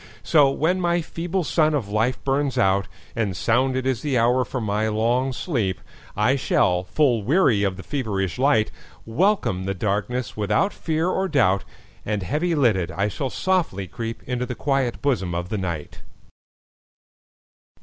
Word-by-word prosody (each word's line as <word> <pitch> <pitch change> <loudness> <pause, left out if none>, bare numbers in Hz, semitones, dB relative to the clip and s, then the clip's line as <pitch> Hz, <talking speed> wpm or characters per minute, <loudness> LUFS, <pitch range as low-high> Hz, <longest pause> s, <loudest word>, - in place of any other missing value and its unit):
So 145 -4 +5
when 170 +7 0
my 175 0 +2
feeble 175 +3 -3
sun 155 0 +2
of 125 -8 -2
life 115 +5 0
burns 135 -1 0
out, 100 -4 +2 0.3
And 100 -6 -1
sounded 130 +5 +1
is 130 -3 0
the 140 -4 0
hour 120 +2 +3
for 130 +2 -4
my 105 -1 0
long 120 +5 +1
sleep,I 115 - -2
shall, 90 -8 +1
full 125 -1 +2
weary 130 - +3
of 95 -2 0
the 95 - -8
feverish 105 - -2
light, 130 -6 +3 0.3
Welcome 115 - +1
the 95 0 -2
darkness 105 +6 -2
without 105 - +1
fear 160 +1 -1
or 190 +1 0
doubt, 110 - +2 0.4
And 105 -2 -2
heavy 155 - 0
lidded, 105 - +2
I 100 +4 -1
shall 130 +6 -3
softly 165 - -1
creepInto 120 +2 -4
the 125 - -4
quiet 135 -1 -1
bosom 95 -11 0
of 85 +1 -3
the 105 -1 -2
Night. 85 -5 -5
120 Hz, 150 wpm, -23 LUFS, 100-145 Hz, 0.4 s, So